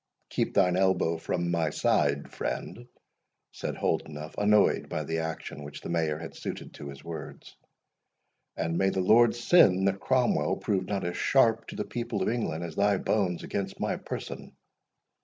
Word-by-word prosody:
"Keep - - -1
thine 90 -1 +4
elbow 95 -3 +2
from 85 +1 -1
my 85 -2 +1
side, 70 -1 +1
friend," 120 +1 -4 0.6
said - - -4
Holdenough, 75 0 -2
annoyed 105 0 +3
by 80 - -2
the 80 +2 -2
action 80 -2 -5
which 70 0 -9
the - - -7
Mayor 80 -3 0
had 80 +1 -8
suited - - -6
to 70 - -8
his 70 -1 -11
words; 85 -1 -8 1.0
"and 85 +1 -1
may 95 - +3
the 95 - -2
Lord 115 +6 +5
send 115 - +5
that 100 0 0
Cromwell 130 +2 +1
prove 95 -3 -1
not 100 -3 -2
as 90 0 -3
sharp 115 -4 +3
to - - -8
the - - -3
people 120 -1 -3
of - - +1
England 85 -9 -2
as 85 -2 -6
thy 100 0 +3
bones 95 -4 0
against 100 -1 -4
my - - 0
person! - - -7
90 Hz, 170 wpm, -28 LUFS, 80-105 Hz, 1.0 s, Lord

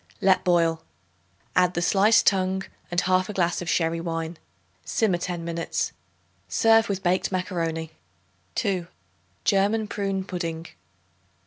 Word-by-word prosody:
Let 190 -3 +3
boil. 165 -2 +2 0.7
Add 180 0 +3
the 175 - 0
sliced 210 +4 +4
tongue, 190 0 +2 0.3
and 175 -1 +1
1/2 185 +2 +1
glass 175 -1 +1
of 175 - -4
sherry 165 0 +1
wine. 165 0 -4 0.5
Simmer 195 -6 +1
ten 175 -1 -4
minutes. 170 0 -2 0.6
Serve 225 -1 +4
with 195 -1 -2
baked 180 +2 +1
macaroni. 165 -4 -2 0.6
2. 185 -5 -1 0.6
German 205 +2 +2
Prune 195 -2 -2
Pudding. 170 -3 -4
180 Hz, 120 wpm, -25 LUFS, 170-195 Hz, 0.7 s, sliced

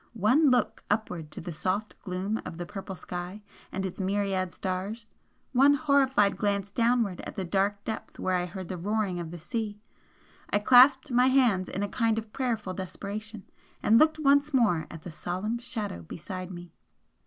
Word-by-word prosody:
One 260 +9 +4
look 250 -1 +1
upward 180 -7 -1
to - - -8
the 175 - -6
soft 190 +7 -2
gloom 190 +4 -3
of 165 - -7
the 175 - -4
purple 195 0 -7
sky 180 +4 -6 0.3
and 190 0 -2
its 190 +1 -4
myriad 190 -1 0
stars 195 +5 -4 0.5
one 275 +3 +6
horrified 270 -8 +3
glance 200 -1 0
downward 230 -4 +1
at - - -8
the 190 - -2
dark 200 +3 0
depth 220 - -6
where 185 - -1
I 180 0 0
heard 185 0 -7
the 185 - -5
roaring 200 -1 -1
of 170 -2 -5
the 175 - -7
sea! 210 +4 -4 0.7
I - - +2
clasped 255 +5 +6
my 250 +1 +5
hands 240 -9 +3
in 195 - -2
a - - 0
kind 225 +1 +1
of 220 -1 -5
prayerful 225 -7 -2
desperation, 205 +3 -6 0.4
and 225 +2 +6
looked 315 0 +4
once 285 -1 +3
more 210 -11 +3
at 160 -1 -10
the 175 - -7
solemn 185 +8 -3
Shadow 215 - -4
beside 185 - -7
me. 175 -1 -9
205 Hz, 175 wpm, -28 LUFS, 185-235 Hz, 0.7 s, one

